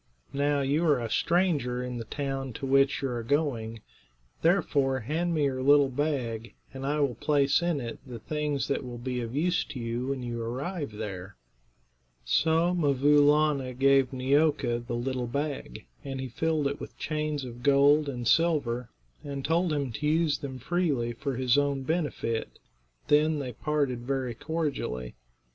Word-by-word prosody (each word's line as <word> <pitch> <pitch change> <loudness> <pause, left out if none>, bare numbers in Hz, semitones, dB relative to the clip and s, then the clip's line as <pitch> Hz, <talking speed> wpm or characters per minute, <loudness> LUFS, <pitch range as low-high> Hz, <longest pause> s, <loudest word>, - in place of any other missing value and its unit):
Now, 145 0 +1
you 140 +4 +1
are 145 -4 +4
a 115 -2 -4
stranger 150 -9 +1
in 125 -1 -4
the 115 - -5
town 135 0 -4
to 135 - -5
which 135 +1 +3
you 135 - 0
are 120 -1 -3
going; 115 -4 -1 0.6
therefore 140 -7 +2
hand 165 +8 -1
me 150 - +1
your 130 -2 0
little 140 0 +5
bag, 125 -5 -2 0.2
and 135 0 -5
I 150 +1 0
will 140 -3 +1
place 140 +5 +2
in 170 -4 0
it 115 -3 -6
the 125 -3 -8
things 150 +3 -2
that 140 - -1
will 125 -1 -7
be 125 +1 -3
of 115 +2 -5
use 175 +4 +1
to 130 - -7
you 120 +2 -3
when 135 -2 -2
you 120 -1 -4
arrive 140 - -4
there." 100 -3 -6 0.9
So 160 - +2
'Mvoo 145 -3 +3
Laana 145 -3 +3
gave 135 -1 +4
Neeoka 135 -2 +2
the 120 0 -5
little 125 0 -2
bag, 140 - -4 0.2
and 135 -1 -5
he 130 -1 -4
filled 155 +4 0
it 140 +1 -2
with - - -9
chains 150 -2 -2
of 120 -1 -9
gold 145 +2 +4
and 120 -3 -4
silver, 140 -7 +2 0.3
and 140 -2 -5
told 170 +2 +2
him 140 -4 -1
to 150 +6 -3
use 155 -1 +2
them 135 -2 -6
freely 135 -5 0
for 135 +3 -3
his 130 +2 +3
own 140 -1 0
benefit. 145 -7 -2 0.5
Then 155 +1 +4
they 130 -4 -4
parted 140 -1 -1
very 130 0 -2
cordially. 135 - -3
140 Hz, 170 wpm, -28 LUFS, 125-150 Hz, 0.9 s, little